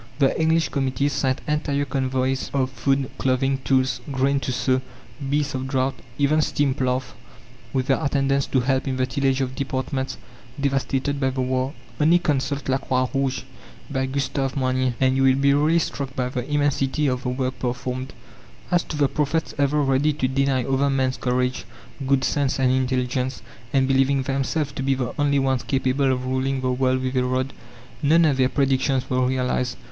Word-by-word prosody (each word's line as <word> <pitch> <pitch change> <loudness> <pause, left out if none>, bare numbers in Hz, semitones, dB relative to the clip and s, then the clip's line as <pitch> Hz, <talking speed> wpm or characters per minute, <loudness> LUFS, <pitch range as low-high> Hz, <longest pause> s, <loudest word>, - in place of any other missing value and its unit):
The 140 -2 +3
English 160 +1 +2
committees 140 +1 0
sent 130 -1 0
entire 145 -1 0
convoys 130 -1 -1
of 130 -1 +1
food, 135 0 0
clothing, 135 +1 +1
tools, 130 -1 +1
grain 135 +1 +1
to 135 - -3
sow, 130 +1 +1 0.5
beasts 145 0 0
of 130 0 -3
draught, 135 0 -1 0.2
even 145 +2 +3
steam 145 -2 +1
ploughs 130 -1 -1 0.6
with 130 0 0
their 135 - +1
attendants 140 -1 +1
to 130 - +1
help 130 +2 0
in 130 -1 -1
the 130 - +2
tillage 135 0 0
of 130 -1 -2
departments 130 0 -3 0.4
devastated 140 0 0
by 135 -1 +2
the 130 0 -2
war! 130 +1 -1 0.3
Only 160 +3 +5
consult 140 -4 -1
La 135 0 +1
Croix 130 -1 0
Rouge, 135 -2 0 0.5
by 130 -1 0
Gustave 135 0 -2
Moynier, 130 -1 +1
and 130 0 +3
you 135 - +1
will 135 -1 +5
be 140 +1 +3
really 150 +4 +3
struck 140 -4 -2
by 125 -1 -1
the 125 +1 -4
immensity 145 0 +1
of 130 -2 0
the 125 - -2
work 130 0 -2
performed. 125 +1 -3 0.6
As 175 -1 +4
to 155 - -5
the 145 -1 +3
prophets 150 +3 -1
ever 145 +1 +2
ready 135 +3 +2
to 130 -3 0
deny 135 -1 +1
other 135 +2 +1
men's 130 -1 0
courage, 125 0 0 0.4
good 135 -1 +3
sense, 140 -2 0
and 130 -1 +3
intelligence, 130 0 -1 0.3
and 135 -1 +3
believing 135 0 +2
themselves 135 +2 -1
to 135 - -5
be 135 0 +1
the 125 -2 -3
only 145 -1 +3
ones 135 -2 +1
capable 130 +3 +1
of 130 0 -2
ruling 130 +1 -1
the 130 0 0
world 130 0 +1
with 130 0 -2
a 125 - +3
rod, 130 +1 -1 0.5
none 160 +3 +5
of 145 -4 +2
their 130 -1 +3
predictions 135 -1 +1
were 130 -1 +1
realized. 125 -1 -1
135 Hz, 185 wpm, -23 LUFS, 130-140 Hz, 0.6 s, Only